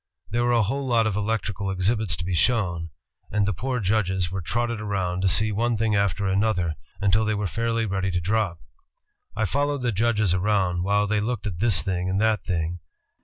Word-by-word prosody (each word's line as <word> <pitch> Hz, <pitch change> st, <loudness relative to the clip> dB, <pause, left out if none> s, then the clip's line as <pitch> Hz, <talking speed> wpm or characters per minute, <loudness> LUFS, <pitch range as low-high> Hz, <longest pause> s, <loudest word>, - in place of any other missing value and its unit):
There 120 Hz, +2 st, +1 dB
were 120 Hz, -, +2 dB
a 120 Hz, -2 st, +4 dB
whole 135 Hz, +6 st, -2 dB
lot 115 Hz, -2 st, +3 dB
of 110 Hz, -3 st, 0 dB
electrical 105 Hz, -2 st, -2 dB
exhibits 95 Hz, -1 st, 0 dB
to 85 Hz, +4 st, -6 dB
be 90 Hz, -, -2 dB
shown..., 85 Hz, -4 st, +1 dB, 0.4 s
and 105 Hz, -1 st, +1 dB
the 105 Hz, -, 0 dB
poor 125 Hz, +8 st, -2 dB
judges 95 Hz, -3 st, 0 dB
were 95 Hz, 0 st, -3 dB
trotted 115 Hz, +5 st, -2 dB
around 95 Hz, -4 st, -2 dB
to 95 Hz, -, +2 dB
see 110 Hz, +3 st, +4 dB
one 115 Hz, +2 st, 0 dB
thing 110 Hz, -1 st, +1 dB
after 100 Hz, 0 st, +1 dB
another 95 Hz, -4 st, +1 dB, 0.3 s
until 100 Hz, +2 st, +3 dB
they 110 Hz, 0 st, 0 dB
were 105 Hz, 0 st, -2 dB
fairly 115 Hz, +3 st, -1 dB
ready 95 Hz, -1 st, -1 dB
to 90 Hz, -1 st, 0 dB
drop. 95 Hz, -1 st, 0 dB, 0.8 s
I -, -, 0 dB
followed 145 Hz, -1 st, 0 dB
the 120 Hz, -, +1 dB
judges 110 Hz, -2 st, +1 dB
around, 95 Hz, -2 st, +1 dB
while 100 Hz, +2 st, +2 dB
they 105 Hz, 0 st, 0 dB
looked 115 Hz, 0 st, -3 dB
at 90 Hz, -5 st, -4 dB
this 100 Hz, -6 st, +3 dB
thing 90 Hz, -1 st, -1 dB
and 95 Hz, +1 st, 0 dB
that 110 Hz, -2 st, +2 dB
thing. 85 Hz, -1 st, -2 dB
105 Hz, 205 wpm, -25 LUFS, 95-110 Hz, 0.8 s, a